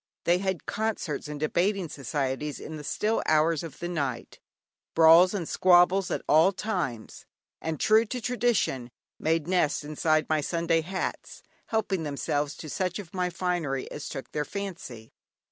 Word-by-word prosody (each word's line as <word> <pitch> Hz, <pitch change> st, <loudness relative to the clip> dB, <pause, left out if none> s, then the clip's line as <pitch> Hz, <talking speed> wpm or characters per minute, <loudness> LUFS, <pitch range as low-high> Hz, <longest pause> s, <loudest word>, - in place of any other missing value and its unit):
They 175 Hz, +1 st, +3 dB
had 190 Hz, -3 st, -2 dB
concerts 210 Hz, -10 st, -2 dB
and 150 Hz, -1 st, -6 dB
debating 180 Hz, +5 st, 0 dB
societies 140 Hz, +1 st, -3 dB
in 160 Hz, -, -7 dB
the 150 Hz, -, -7 dB
still 215 Hz, +9 st, 0 dB
hours 155 Hz, 0 st, +3 dB
of 165 Hz, -4 st, -8 dB
the 175 Hz, -, -4 dB
night, 140 Hz, -8 st, -3 dB, 0.6 s
brawls 165 Hz, +4 st, +7 dB
and 175 Hz, -5 st, -3 dB
squabbles 180 Hz, +1 st, +4 dB
at -, -, -2 dB
all 160 Hz, +5 st, +5 dB
times; 175 Hz, -, -4 dB, 0.3 s
and 160 Hz, -2 st, -3 dB
true 220 Hz, +1 st, +4 dB
to 250 Hz, +3 st, -4 dB
tradition, 235 Hz, -, 0 dB, 0.3 s
made 160 Hz, 0 st, 0 dB
nests 175 Hz, -6 st, +1 dB
inside 155 Hz, +1 st, +1 dB
my 155 Hz, -1 st, +1 dB
Sunday 165 Hz, +1 st, +1 dB
hats, 185 Hz, +4 st, -5 dB, 0.2 s
helping 210 Hz, -5 st, 0 dB
themselves 145 Hz, -1 st, -2 dB
to 155 Hz, -, -8 dB
such 180 Hz, +3 st, -2 dB
of 190 Hz, -5 st, -9 dB
my 180 Hz, -1 st, 0 dB
finery 170 Hz, -7 st, -2 dB
as 150 Hz, -, -6 dB
took 135 Hz, -, -7 dB
their 150 Hz, -, -1 dB
fancy. 155 Hz, -, -7 dB
165 Hz, 155 wpm, -27 LUFS, 150-190 Hz, 0.6 s, brawls